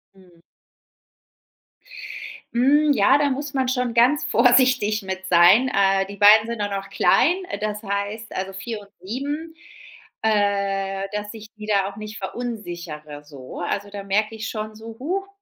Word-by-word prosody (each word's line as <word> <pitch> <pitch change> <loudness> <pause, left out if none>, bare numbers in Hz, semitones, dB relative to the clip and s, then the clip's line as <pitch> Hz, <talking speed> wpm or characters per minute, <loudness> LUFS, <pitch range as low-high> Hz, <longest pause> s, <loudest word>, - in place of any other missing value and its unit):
Mhm. 180 -3 -21 2.1
Hm, 290 +5 +4
ja, 210 +2 +4
da 290 -1 +1
muss 280 +1 -4
man 260 -1 +1
schon 250 -2 -1
ganz 255 +6 +4
vorsichtig 245 -4 +3
mit 190 0 -6
sein. 180 +9 +6
Äh, 195 0 +3
die 200 +1 -10
Beiden 210 +2 +7
sind 235 -2 -4
auch 205 - -1
noch 195 -1 -5
klein, 350 - +3
äh, - - -5
das 210 0 -3
heißt, 205 +2 -4
also, 190 0 -4
4 215 +3 -5
und 200 - -17
7, 290 - -5 0.7
äh, 200 -2 0
dass 210 +1 -4
ich 220 -1 -10
die 210 - -8
da 200 -2 +2
auch 195 - -15
nicht 215 +1 -8
verunsichere, 175 -9 -6
so. 140 -3 -10
Also, 200 +3 -3
da 200 0 -7
merke 210 +3 0
ich 220 0 -5
schon 215 -1 -5
so: 225 +1 -10
„Huch“, 375 +8 -3
210 Hz, 160 wpm, -22 LUFS, 195-245 Hz, 2.1 s, Beiden